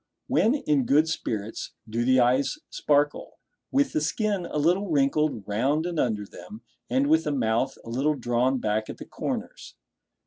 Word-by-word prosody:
When 230 +6 +2
in 150 - +1
good 150 +3 +4
spirits 110 -9 -4
do 115 +2 -1
the 130 +1 +4
eyes 130 +3 +2
sparkle, 145 0 0 0.3
with 280 0 +2
the 155 - +1
skin 200 +2 -1
a - - -4
little 180 +6 +2
wrinkled 140 -6 +1
round 135 +10 0
and 175 -3 -2
under 105 -4 0
them, 210 - -12 0.3
and 265 +2 +2
with 320 +3 +3
the - - 0
mouth 115 -4 0
a - - -8
little 140 +5 +1
drawn 125 +1 +1
back 110 -2 -1
at - - -6
the - - -9
corners? - - -5
140 Hz, 170 wpm, -26 LUFS, 120-165 Hz, 0.3 s, good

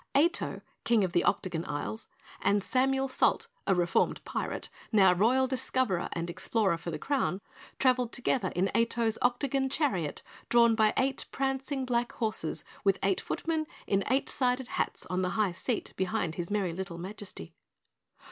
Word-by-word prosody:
Ato, 335 +5 +2 0.2
King 230 -3 +3
of 185 - 0
the 175 - +2
Octagon 170 -3 0
Isles, 145 +10 -4 0.3
and 200 -1 +2
Samuel 270 +2 +2
Salt, 270 - +2 0.2
a 195 - +4
reformed 175 -1 +1
Pirate, - - -3 0.2
now 195 -5 +6
Royal 240 +8 +3
Discoverer 255 -7 0
and 170 0 -3
Explorer 195 +2 +1
for 170 - -5
the 165 - -3
Crown, 270 -10 0 0.4
traveled 255 -2 +2
together 245 -5 0
in 185 +2 +1
Ato's 230 -1 +1
Octagon 265 +2 +1
Chariot 195 - -1 0.3
drawn 235 -1 +6
by 220 -1 +4
eight 265 0 +1
prancing 270 0 -1
black 240 -1 0
horses 215 -8 -2 0.2
with 195 -1 +3
eight 195 -1 +2
footmen 320 -1 -2 0.2
in 195 0 +1
eight 265 +2 +2
sided 250 -1 0
hats - - -2
on 185 0 -1
the 180 - 0
high 210 -4 +2
seat 220 +6 -3
behind 190 -3 -1
his 175 0 -4
merry 200 -5 0
little 185 -1 -5
Majesty. 185 - -8
220 Hz, 155 wpm, -30 LUFS, 185-260 Hz, 0.4 s, now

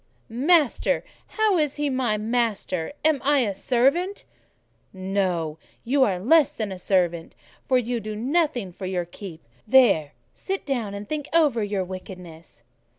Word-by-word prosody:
"Master! 285 +4 +2 0.2
How 430 -5 +1
is 300 -2 0
he 295 0 -1
my 255 -5 0
master? 215 - -1
Am 310 -3 +3
I 285 0 +3
a 210 -5 0
servant?" 275 - +1 0.7
"No; 185 -5 -2 0.2
you 265 +3 +3
are 195 -7 +1
less 280 - +4
than 215 -3 -4
a 185 - -6
servant, 175 -3 0 0.3
for 260 - +4
you 245 -1 -1
do 215 0 -6
nothing 255 - 0
for 185 +2 -7
your 180 -2 -2
keep. 175 -2 -10 0.2
There, 200 - +4 0.2
sit 385 0 -4
down, 235 -8 -2
and 200 0 -7
think 300 -2 -4
over 295 -9 +3
your 200 -2 -1
wickedness." 180 -7 -10
220 Hz, 150 wpm, -24 LUFS, 185-280 Hz, 0.7 s, less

